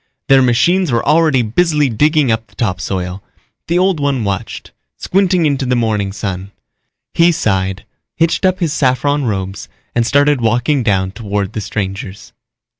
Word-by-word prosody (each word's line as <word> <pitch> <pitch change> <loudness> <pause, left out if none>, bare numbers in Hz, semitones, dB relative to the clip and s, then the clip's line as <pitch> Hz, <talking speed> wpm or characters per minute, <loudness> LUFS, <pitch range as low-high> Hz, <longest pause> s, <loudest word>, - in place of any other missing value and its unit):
Their 135 -1 +6
machines 160 +8 +2
were 115 -1 0
already 150 -4 +3
busily 150 +6 +1
digging 145 +3 +2
up 110 0 -2
the 100 - -26
topsoil. 95 -3 -3 0.4
The 170 - +1
Old 185 -2 +2
One 140 -4 0
watched, 100 -2 -4 0.3
squinting 185 -3 +1
into 140 -2 0
the 125 -1 0
morning 110 -4 0
sun. 95 -1 -5 0.6
He 170 +1 +4
sighed, 95 - -1 0.3
hitched 165 +3 +1
up 185 -1 +2
his 160 -4 0
saffron 145 0 +1
robes 95 -3 -4 0.2
and 120 - +2
started 145 +2 +2
walking 120 +5 +1
down 95 -4 0
toward 100 -2 -3
the 110 - -3
strangers. 95 +1 -5
120 Hz, 150 wpm, -16 LUFS, 100-150 Hz, 0.6 s, Their